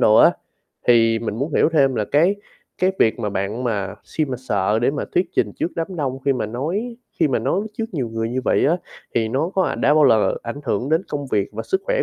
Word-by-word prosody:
đồ 110 - +5
á. - - +8 0.6
Thì 115 -2 +5
mình 110 -2 -4
muốn 145 +5 -2
hiểu - - +4
thêm 135 -4 +3
là 110 -3 0
cái 165 - +3 0.4
cái 185 +1 +2
việc 110 - +3
mà 105 -3 -2
bạn 100 +6 -3
mà 100 -5 -2
xi 155 - -1
mà 130 -3 -4
sợ 105 -4 0
để 125 - +3
mà 145 - -3
thuyết 180 +1 +3
trình - - +1
trước - - -2
đám 170 +2 -3
đông 135 -4 -2
khi 140 - +3
mà 125 - -2
nói 175 - -3 0.2
khi 160 -3 +3
mà 130 - +1
nói 135 - 0 0.2
trước 225 - 0
nhiều 130 -7 -1
người 115 0 -3
như 130 +2 -1
vậy - - +2
á, 165 +4 +3 0.4
thì 110 -1 +1
nó 140 +8 -1
có 190 - +3
ảnh - - -2
đã 145 - +4
bao 155 -1 +5
lờ 110 -6 +4
ảnh 120 +5 -6
hưởng 120 +6 -1
đến 160 +3 +2
công 145 -1 -4
việc 105 -6 0
và - - -4
sức 380 - -1
khỏe - - +1
130 Hz, 255 wpm, -21 LUFS, 115-160 Hz, 0.6 s, á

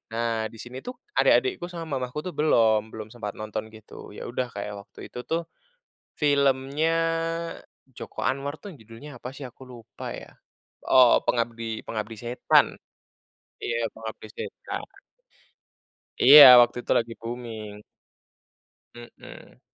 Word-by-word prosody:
Nah 115 -1 -1
di 115 - -16
sini 120 +3 -9
tuh, 250 - -8 0.2
adik-adikku 390 - +3
sama 165 -6 -5
mamahku 125 +4 -5
tuh 185 - -5
belum, 110 -8 +2
belum 110 -1 -8
sempat 110 -4 -6
nonton 110 0 -5
gitu. 110 - -13
Ya - - -8
udah 125 +1 -3
kayak 100 0 -5
waktu - - -12
itu - - -7
tuh, 165 +1 -3 0.6
filmnya 140 +2 +1 1.0
Joko 125 - -8
Anwar 140 +2 -1
tuh 200 +6 -10
yang 160 - -14
judulnya 115 +6 -12
apa 125 +2 -8
sih, 145 - -10
aku 130 0 -10
lupa 120 -3 -9
ya. - - -10 0.6
Oh, 130 -2 +6
Pengabdi 115 -1 -2
Pengabdi 110 0 -5
Setan. 120 +2 +2 0.9
Iya 115 -1 -1
Pengabdi 110 -1 -8
Setan. - - -6 1.4
Iya, 145 +4 +11 0.2
waktu 120 - +3
itu - - -9
lagi 115 0 -3
booming. 115 -3 -7 1.1
Hmm. - - -14
120 Hz, 130 wpm, -25 LUFS, 110-140 Hz, 1.4 s, Iya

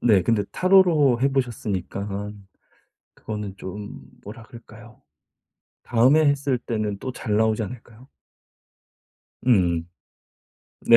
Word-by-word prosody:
네. 105 -6 +4
근데 110 -1 +1
타로로 170 -10 +4
해 135 - +3
보셨으니깐 105 -5 -4 0.7
그거는 105 -3 -6
좀 100 +2 -8 0.2
뭐라 110 +3 -9
그럴까요 115 0 -15 0.8
다음에 130 +7 +4
했을 140 -2 +1
때는 110 -4 -3
또 130 +3 -5
잘 105 -4 -2
나오지 110 0 +2
않을까요? 120 +3 -10 1.4
음. 90 -8 +2 0.9
네. 115 - +6
110 Hz, 220 characters per minute, -23 LUFS, 105-130 Hz, 1.4 s, 네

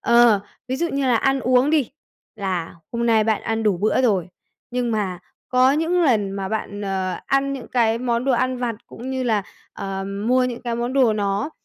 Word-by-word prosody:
Ờ, 235 -3 +5 0.3
ví 260 - -1
dụ 340 +4 0
như 280 -3 -1
là 245 - +4
ăn 270 +4 +1
uống 255 +3 +3
đi, 295 -6 +2 0.5
là 185 -5 -3 0.2
hôm 235 0 -1
nay 220 -2 +4
bạn 220 -2 0
ăn 225 0 -1
đủ 210 -4 +2
bữa 215 +6 +2
rồi, 195 -8 +2 0.4
nhưng 245 -1 -1
mà 200 -5 -1 0.3
có 255 +1 +4
những 330 +4 +1
lần 215 -10 +2
mà 195 -1 -4
bạn, 205 -1 -4
ờ, 190 -2 -2
ăn 275 0 +1
những 270 -3 -7
cái 230 -2 +2
món 240 0 -1
đồ 270 - +2
ăn 255 +1 +1
vặt, 240 -2 -1
cũng 255 +3 -8
như 260 -1 -2
là, 220 -5 +1 0.3
ờ, 195 0 -4
mua 225 +6 +1
những 245 -1 -3
cái 235 -1 -2
món 240 +2 -2
đồ 255 -5 +4
nó, 205 +5 -1
235 Hz, 210 wpm, -22 LUFS, 205-255 Hz, 0.5 s, Ờ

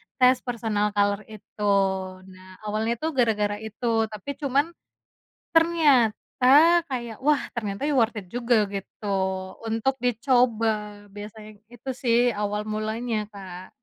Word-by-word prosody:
tes 255 -1 +5
personal 220 -4 -2
color 205 +1 +1
itu, 210 -1 -2 0.6
nah 185 0 -15
awalnya 215 +2 -1
tuh 320 +6 -3
gara-gara 210 -5 +1
itu 225 +1 -1
tapi 215 +6 -7
cuman. 285 +3 +1 0.8
Ternyata 290 -8 +3 0.4
kayak, 235 -4 -4
"Wah 300 -1 +4
ternyata 210 +1 -4
worth 235 -3 +2
it 195 -3 -6
juga," 235 -3 +2
gitu 200 +1 -7 0.6
untuk 225 +4 0
dicoba 225 -4 +1
biasanya 210 0 -10
itu 240 +2 -8
sih 235 -3 +2
awal 210 0 -2
mulanya, 220 +1 -2
Kak. 185 -2 -9
220 Hz, 115 wpm, -25 LUFS, 210-245 Hz, 0.8 s, tes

